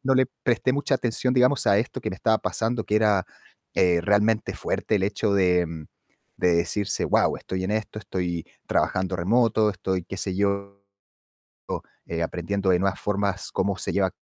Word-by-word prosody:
no 135 0 +3
le 130 -1 +4 0.2
presté 125 0 +2
mucha 140 0 +1
atención, 125 +1 -1
digamos, 130 +2 +3
a 100 0 +5
esto 115 - -3
que - - -3
me 95 - -6
estaba 110 +2 +2
pasando, 115 0 -1
que 105 - +1
era, 105 -4 +3 0.5
eh, 90 -2 +3
realmente 105 +4 +2
fuerte 110 - -1
el 95 - -1
hecho 105 0 0
de 90 -2 +3 0.7
de 90 - +3
decirse: 95 +4 0
"Guau, - - +2
estoy 95 0 -4
en 95 - -2
esto, 110 0 -3
estoy 90 -5 -3 0.2
trabajando 95 0 0
remoto, 110 +3 +3
estoy 95 -2 -3
qué 95 - -7
sé 95 -3 -2
yo, 100 0 -1 1.2
eh, 85 0 -2
aprendiendo 95 +3 -1
de 90 - +4
nuevas 95 -1 0
formas 100 -2 -1
cómo 100 -1 0
se - - -3
lleva 95 -1 +2
a 95 - -12
100 Hz, 175 wpm, -25 LUFS, 95-110 Hz, 1.2 s, a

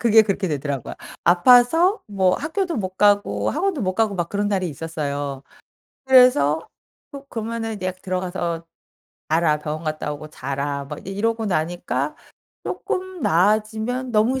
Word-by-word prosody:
그게 225 -2 +6
그렇게 195 -3 -1
되더라고요. 140 -3 -3 0.3
아파서 245 - +5
뭐 190 -3 +2
학교도 335 +3 -2
못 190 -4 -4
가고 205 0 +2
학원도 350 -1 -1
못 185 -3 -1
가고 220 -1 +1
막 175 -2 -2
그런 205 +2 -1
날이 190 -3 0
있었어요. 145 -3 -4 0.6
그래서 250 - +5 0.5
허 280 0 -9
그러면은 225 -2 -4
약 185 0 -3
"들어가서 180 -2 -3 0.6
자라. 160 -1 +3
병원 155 +2 -5
갔다 155 -1 -3
오고 150 +1 -8
자라." 140 0 -3
막 150 +2 -8
이러고 220 +3 -1
나니까 155 -5 -1 0.5
쪼끔 375 -1 -4
나아지면 220 +8 +1
너무 230 +5 +2
190 Hz, 305 characters per minute, -22 LUFS, 155-230 Hz, 0.6 s, 그게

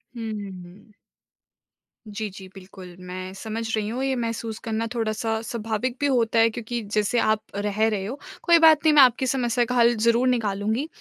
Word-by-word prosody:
हुँ, 225 -1 -5
हुँ, 205 -2 -6
हुँ। 200 +5 -17 1.1
जी, 210 0 -5
जी, 190 0 -11
बिल्कुल 185 -1 -12
मैं 185 +1 -6
समझ 220 +3 -5
रही 210 -1 -2
हूँ। 255 +3 -3
ये 265 -1 0
महसूस 230 -2 -4
करना 225 0 -2
थोड़ा-सा 220 -1 -2
स्वाभाविक 230 +2 -3
भी 285 - 0
होता 235 -4 +2
है 225 0 +5
क्योंकि 235 +1 -5
जैसे 210 +3 +1
आप 215 -1 +1
रह 210 +2 0
रहे 200 -3 -2
हो 260 +7 -6 0.2
कोई 340 -1 +5
बात 315 -1 +6
नहीं 310 - +5
मैं 295 - +8
आपकी 255 0 +4
समस्या 240 -2 +1
का 250 - -3
हल 240 0 +4
ज़रूर 235 +3 +2
निकालूँगी। 220 +3 0
225 Hz, 185 wpm, -24 LUFS, 210-240 Hz, 1.1 s, मैं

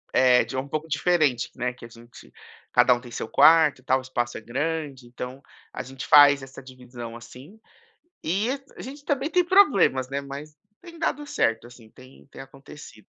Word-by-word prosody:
Eh, 125 -1 +4
de - - -8
um 130 +2 -3
pouco 155 +3 -4
diferente, 155 -5 +1
né, 125 0 -3
que 125 - -18
a - - -12
gente 120 +1 -16 0.4
cada - - +5
um 120 - -4
tem 120 - -12
seu 115 - -5
quarto, 155 +1 +5
e - - -31
tal, 130 0 +2
o - - -6
espaço 120 -2 -4
é - - -9
grande, 140 0 -4
então 125 +2 -8 0.3
a - - -5
gente 130 +1 -9
faz 140 -1 +7
essa 135 0 -11
divisão, 125 -3 -11
assim. 130 - -14 0.6
E 195 +8 -1 0.3
a - - -11
gente 280 +3 -10
também 285 0 -1
tem 360 0 +2
problemas, 265 - +3
né, 140 +1 -3
mas 140 +2 -10 0.2
tem 340 -1 -13
dado 295 -2 -2
certo, 115 - -1
assim, 120 -2 -16
tem 130 +3 -18
tem - - -12
acontecido. 135 -5 -14
135 Hz, 190 wpm, -24 LUFS, 125-160 Hz, 0.6 s, faz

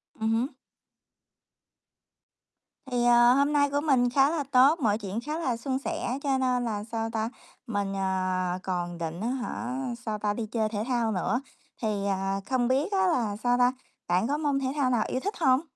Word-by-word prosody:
Ừm 220 0 0
hứm. 235 +3 +1 2.4
Thì, 245 -1 +1
ờ, 240 0 +6
hôm 280 +3 +2
nay 285 -1 +3
của 285 +1 0
mình 260 -5 +3
khá 270 +3 +4
là 320 -3 -1
tốt, 275 +6 +6
mọi 215 -7 +2
chuyện 205 0 -4
khá 300 +5 -4
là 255 -8 -1
suôn 260 +3 -2
sẻ, 265 -1 -3
cho 275 -2 +1
nên 250 -1 +1
là, 210 -3 -2
sao 225 0 -3
ta, 225 0 -2 0.4
mình, 200 -3 -2
ờ, 185 -1 -1
còn 175 -2 -3
định 165 +1 -4
á 225 - -1
hả, 250 0 -3 0.3
sao 215 -2 -2
ta, 210 0 0
đi 225 +1 -3
chơi 220 0 -1
thể 210 -1 -2
thao 240 -3 +1
nữa, 220 +5 0 0.4
thì, 210 -3 -1
à, 195 0 -1
không 255 -2 +1
biết 275 - +1
á 380 -1 +2
là, 235 - +1
sao 245 0 +3
ta, 250 0 +4 0.3
bạn 180 +5 +2
có 290 +2 0
môn 290 -3 0
thể 270 - -1
thao 275 -4 +2
nào 240 -3 +2
yêu 255 - -1
thích 405 +9 -3
hông? 265 -4 +4
240 Hz, 200 wpm, -27 LUFS, 210-265 Hz, 2.4 s, ờ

